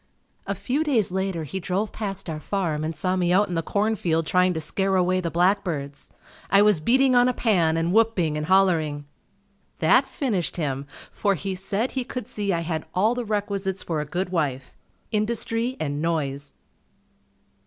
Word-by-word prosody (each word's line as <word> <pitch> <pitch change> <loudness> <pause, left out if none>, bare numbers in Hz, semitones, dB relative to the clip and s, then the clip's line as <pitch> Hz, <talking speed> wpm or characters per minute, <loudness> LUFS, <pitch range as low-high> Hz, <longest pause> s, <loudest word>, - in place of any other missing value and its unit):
A 200 - -1
few 250 - -1
days 240 - +1
later 190 -3 -2
he 190 +6 -4
drove 195 +4 -2
past 195 -4 -4
our 155 -2 -4
farm 160 -4 -2
and 160 +1 -3
saw 185 +4 0
me 175 -1 +1
out 195 +2 +3
in - - -3
the 165 - 0
corn 210 +6 0
field 165 -4 0
trying 180 +2 +3
to - - -1
scare 190 +4 0
away 185 0 +2
the 170 - -2
blackbirds. 170 -6 0 0.4
I 200 +1 +6
was 210 -7 +4
beating 260 +7 +4
on 245 0 +5
a 250 - -2
pan 170 -8 +2
and 165 +2 0
whooping 210 -9 +2
and 150 0 -3
hollering. 165 -6 +2 0.7
That 245 - +4
finished 200 - -2
him 140 -4 -2 0.2
for 200 -2 +1
he 195 +3 -4
said 200 +6 -2
he 260 - -2
could 250 -2 -6
see 205 -1 -2
I 170 -2 0
had 160 -1 -3
all 210 +6 +3
the 245 0 -3
requisites 200 -2 -2
for 160 -3 -2
a - - -4
good 180 +5 -3
wife, 135 -7 -2 0.4
"Industry 230 +3 -1
and 145 -1 -2
noise." 145 -4 -2
185 Hz, 185 wpm, -24 LUFS, 160-210 Hz, 0.7 s, I